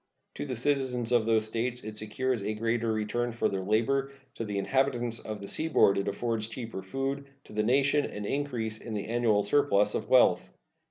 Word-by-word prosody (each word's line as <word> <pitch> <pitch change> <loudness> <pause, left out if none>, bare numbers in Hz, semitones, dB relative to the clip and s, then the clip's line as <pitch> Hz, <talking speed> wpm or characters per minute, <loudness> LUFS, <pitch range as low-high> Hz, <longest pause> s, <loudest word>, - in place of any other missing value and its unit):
To - - -5
the 130 - -3
citizens 125 -2 0
of 120 -2 +3
those 110 -1 +3
States 120 +3 -2
it 110 0 -7
secures 110 +3 -1
a 105 +2 -2
greater 115 +1 0
return 110 +3 -1
for 115 - 0
their 95 -1 -2
labor; 120 +8 +1 0.2
to - - -4
the 105 -2 -3
inhabitants 120 0 0
of 105 -1 -6
the 100 - -7
seaboard 155 -10 +3
it 100 - -2
affords 110 +1 -1
cheaper 115 -3 -6
food; 135 +8 -3 0.2
to - - -14
the 105 - +1
nation, 140 +5 +3
an 105 0 -6
increase 120 -4 -2
in 115 -2 -6
the 100 - -3
annual 115 -3 +2
surplus 105 -3 +3
of - - -3
wealth. - - +4
115 Hz, 195 wpm, -29 LUFS, 105-130 Hz, 0.2 s, wealth